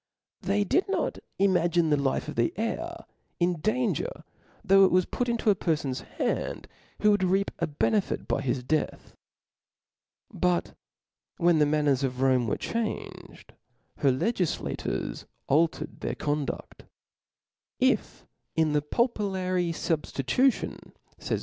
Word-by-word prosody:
They 200 +1 +1
did 365 - +1
not - - -1 0.2
imagine 175 -4 +3
the - - +5
life 135 -1 0
of - - -4
the 115 0 +1
heir 330 +10 -3 0.3
in 175 -1 +1
danger, 250 - -1 0.4
though 195 -1 +6
it 190 - +6
was 185 0 +4
put 245 -1 -2
into 230 -2 +2
a - - +2
perfon's 150 -7 -1 0.2
hands - - -1 0.4
who 210 - +6
would 205 -2 +2
reap 195 +2 +2
a 170 - 0
benefit 185 +7 0
by 135 - 0
his 130 -1 -1
death. 155 +4 -2 1.2
But 180 -1 0 0.6
when 170 -2 +4
the 150 - +4
manners 145 -3 +2
of 125 -1 -2
Rome 130 -3 +3
were - - 0
changed, 230 -2 -5 0.4
her 140 - +3
legiflators 180 - -2 0.2
altered 160 +4 +1
their - - -3
(«)lnfti 145 -1 -1
<^o^duft. - - -7 0.9
If. - - +1 0.3
in 160 -1 +2
the 150 - +3
pupillary 185 - 0
fubftitution, 165 - 0 0.3
fay - - -1
tut. - - -5
175 Hz, 135 wpm, -27 LUFS, 150-205 Hz, 1.2 s, though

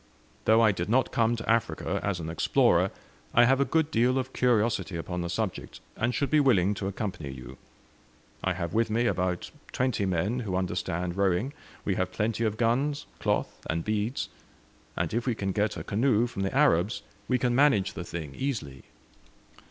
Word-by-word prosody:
Though 110 +1 +5
I 110 -2 +6
did 90 -1 -3
not 130 +3 +2
come 115 0 +2
to 115 - -7
Africa 115 -1 0
as 100 -3 -1
an 80 - -5
explorer, 80 0 +3 0.5
I 120 - +7
have 135 +2 +3
a - - +3
good 160 0 +1
deal 125 +3 +3
of 130 0 -3
curiosity 115 -6 +1
upon 90 +2 -4
the 85 - -3
subject, 95 +1 -3 0.2
and 120 +2 0
should 140 - -1
be 155 - +5
willing 105 -9 +4
to 100 -1 -4
accompany 95 - -4
you. 65 -1 -9 0.8
I 95 - +1
have 85 -2 -4
with 115 0 +2
me 115 +3 +1
about 90 -5 -1 0.2
twenty 125 -6 0
men 95 +7 0
who 100 -6 -3
understand 90 -1 -2
rowing 100 +7 +1 0.3
we 100 - +1
have 95 0 -1
plenty 110 +4 -1
of 110 -1 -1
guns, 135 +6 +1
cloth, - - -1
and 80 +1 -1
beads; 110 +3 -1 0.7
and - - -1
if 120 +3 -1
we 120 - +1
can 95 -2 -2
get 105 +2 0
a - - -5
canoe 115 +1 +2
from 120 -5 -5
the 95 +7 -1
Arabs 110 - +3 0.2
we 125 - +2
can 125 -1 +1
manage 120 -8 +3
the 90 - -5
thing 80 -5 -6
easily." 105 - -4
110 Hz, 185 wpm, -28 LUFS, 90-120 Hz, 0.8 s, I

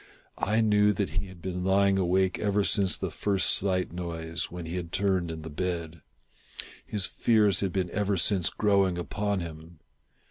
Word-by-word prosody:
I 110 +3 +1
knew 105 -1 +4
that 100 -1 -2
he 95 +1 -3
had 90 -2 -14
been 90 -1 -3
lying 95 +1 +3
awake 95 +1 +1
ever 105 -1 +1
since 100 -2 +2
the - - -4
first 100 -2 +1
slight 90 -3 0
noise, 85 -2 -4
when 90 -1 -7
he 85 +2 -5
had 85 -2 -5
turned 95 -2 +1
in 80 -1 -6
the 80 - -7
bed. 85 -1 -4 0.8
His 100 -3 -2
fears 105 -4 +2
had 100 -2 -1
been 90 -1 -2
ever 100 -1 0
since 90 -2 +2
growing 100 -4 +2
upon 100 +2 -2
him. 80 0 -9
95 Hz, 175 wpm, -28 LUFS, 85-100 Hz, 0.8 s, knew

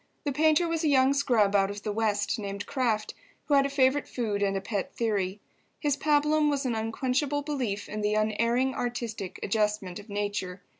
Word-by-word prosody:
The 290 - -1
painter 315 +4 +3
was 330 0 -1
a - - +2
young 270 -1 +4
scrub 235 -8 +2
out 195 -1 +3
of 205 0 -7
the 215 - -2
West 210 +1 0
named 200 0 -5
Kraft, 230 -6 -1 0.3
who 295 - 0
had 275 0 +5
a - - -6
favourite 275 0 +2
food 215 -5 -2
and 195 -1 +1
a - - 0
pet 200 0 -3
theory. 205 -4 -1 0.4
His 290 -3 +1
pabulum 300 +1 +2
was 280 -1 -1
an 250 - 0
unquenchable 260 +6 -1
belief 250 -9 -3
in 215 0 -4
the 210 0 +1
Unerring 230 +5 +1
Artistic 235 -6 -4
Adjustment 210 -3 -1
of 205 +2 -13
Nature. 200 -2 -3
230 Hz, 190 wpm, -28 LUFS, 205-280 Hz, 0.4 s, had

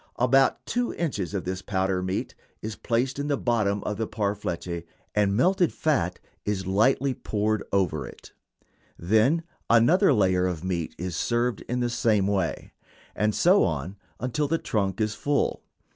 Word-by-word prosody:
About 130 +2 +3
two 245 0 -1
inches 105 - -2
of 95 - -2
this 95 +1 -3
powdered 95 -1 0
meat 95 +1 -3 0.3
is 110 0 -4
placed 125 +6 -1
in 145 - -2
the 145 -1 +1
bottom 105 -5 0
of 105 0 -3
a 110 - -1
parfleche 100 -5 -3 0.3
and 100 -1 +2
melted 180 +5 +3
fat 110 - 0 0.2
is 100 -2 -2
lightly 130 +8 +2
poured 110 -2 -1
over 85 -8 0
it. - - -13 0.7
Then 110 - +2 0.3
another 150 - +5
layer 95 -6 +3
of 85 -3 -4
meat 90 -3 -2
is 90 -1 -4
served 120 +6 0
in 125 +1 0
the 120 - +1
same 110 -4 +2
way, 95 -4 -1 0.4
and 105 +1 +1
so 185 +4 +5
on 80 +4 -2 0.2
until 135 +4 -1
the 165 +3 +1
trunk 100 - -1
is 110 -1 0
full. 145 +5 0
105 Hz, 160 wpm, -26 LUFS, 95-125 Hz, 0.7 s, another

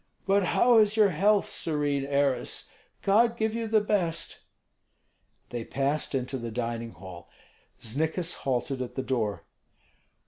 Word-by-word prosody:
"But 195 0 +3
how 240 +5 +5
is 215 0 +3
your 210 -2 +6
health, 200 +5 +3
serene 145 -3 -1
heiress? 140 -3 0 0.4
God 230 +4 +3
give 220 -1 0
you 230 0 -2
the 220 0 +4
best." 185 -6 -1 1.1
They 120 -1 -4
passed 140 +4 -1
into 130 0 -2
the 115 0 -5
dining 115 0 -4
hall; 90 0 -11 0.5
Znikis 160 +8 -1
halted 130 0 -2
at 125 - -5
the 130 - -2
door. 110 -9 -2
145 Hz, 135 wpm, -28 LUFS, 125-200 Hz, 1.1 s, your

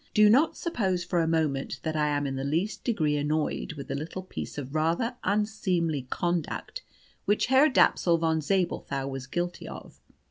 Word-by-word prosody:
Do 210 -1 +7
not 280 +8 +4
suppose 190 - -1
for 175 0 0
a 165 - +1
moment 150 -4 0
that 160 -1 -2
I 150 -1 +2
am 145 -1 0
in 135 -1 -2
the 135 - -3
least 165 +9 -1
degree 155 - +1
annoyed 150 +2 -1
with 140 -3 -8
the - - -3
little 160 +6 -5
piece 185 - -7
of 140 -1 -6
rather 165 +10 0
unseemly 185 -9 0
conduct 175 - -2 0.4
which 205 - +2
Herr 265 +4 +5
Dapsul 175 - +4
von 160 -1 +1
Zabelthau 155 -6 -1
was 135 -1 -5
guilty 175 +4 -3
of. - - -10
165 Hz, 175 wpm, -28 LUFS, 150-195 Hz, 0.4 s, Do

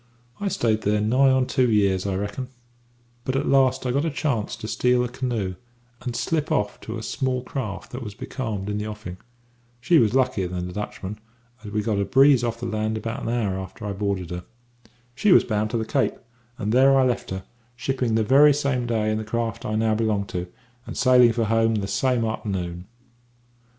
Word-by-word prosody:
"I 205 - -2
stayed 110 - 0
here 105 +1 +2
nigh 125 +6 +4
on 130 -1 +3
two 125 -1 +2
years, 100 -3 +2
I 95 - -1
reckon; 105 +6 -3 0.8
but 130 0 -2
at 135 - 0
last 130 -1 +3
I 125 - +1
got 140 +3 +1
a 165 - 0
chance 140 -7 -1
to 110 - -7
steal 125 +2 +2
a - - -1
canoe 120 -6 -2 0.5
and 125 -2 -4
slip 155 +4 -1
off 105 0 0
to 110 +1 -6
a 110 - -6
small 130 +1 -1
craft 125 -7 -5
that 125 - -6
was 105 -4 -7
becalmed 110 -6 -4
in 105 0 -2
the 105 - -3
offing. 105 -4 -7 0.6
She 165 +6 +4
was 110 -1 +2
luckier 125 -8 +1
than 90 0 -4
the 90 - -7
Dutchman, 105 0 -5 0.4
as 105 - -7
we 105 0 -1
got 105 -2 0
a - - +2
breeze 135 0 +5
off 115 -1 -2
the 120 - -4
land 110 -1 -1
about 115 +1 -4
an - - -3
hour 105 -6 -1
after 95 +3 -8
I 105 - -2
boarded 100 -3 -2
her. 90 0 -5 0.7
"She 200 +10 +2
was - - +7
bound 110 -1 -1
to 115 - -1
the 110 - -2
Cape, 135 +3 0 0.4
and 105 -2 -2
there 135 +3 +5
I 135 - +5
left 125 -1 -1
her, 95 0 -4 0.3
shipping 125 -2 -1
the 110 - +3
very 140 +5 +6
same 135 -4 0
day 110 -2 0
in 110 - -1
the - - -4
craft 115 +2 -3
I 110 - -1
now 110 0 +2
belong 110 -2 0
to, 90 0 -3 0.4
and - - -6
sailing 125 -3 +6
for 115 0 0
home 115 +1 +2
the 100 -2 -2
same 120 +4 +1
a'ternoon." 95 -5 -3
115 Hz, 210 wpm, -24 LUFS, 105-130 Hz, 0.8 s, was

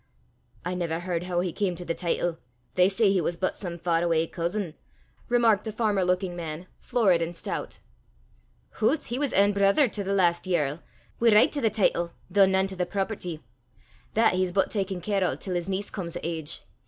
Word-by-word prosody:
"I 180 - -1
never 170 -2 -2
h'ard 175 -1 -2
hoo 175 -1 0
he 180 -2 -2
cam 190 -4 -1
to 175 +1 -8
the 165 - -1
teetle: 170 -1 -1 0.3
they 180 +1 +4
say 200 0 +3
he 190 -2 +2
was 170 +1 -2
but 185 - -1
some 175 -3 -6
far 170 -1 +1
awa' 165 -2 +2
cousin!" 170 +1 -3 0.6
remarked 230 -3 +3
a - - -2
farmer 210 -3 +1
looking 180 0 0
man, 165 0 -5
florid 205 -9 +2
and 170 +1 -3
stout. - - -5 1.0
"Hoots! 265 +8 +2
he 250 - -1
was 285 -2 0
ain 200 +1 +5
brither 200 +8 +4
to 205 -1 -4
the 195 - -3
last 175 -3 +2
yerl, 155 -3 0 0.4
wi' 235 - +5
richt 215 +1 +5
to 290 - -2
the 225 - +3
teetle, 185 -5 +1 0.2
though 200 -1 +6
nane 190 0 +2
to 195 0 -6
the 180 -1 -1
property. 190 -4 -3 0.7
That 225 -1 +4
he's 185 0 0
but 195 +2 +1
takin' 195 -3 -2
care 200 -1 0
o' 180 - +1
till 185 - -5
his 175 +1 -2
niece 195 +1 -2
come 185 -4 -4
o' 170 - -5
age. 160 -2 -3
185 Hz, 205 wpm, -27 LUFS, 170-205 Hz, 1.0 s, though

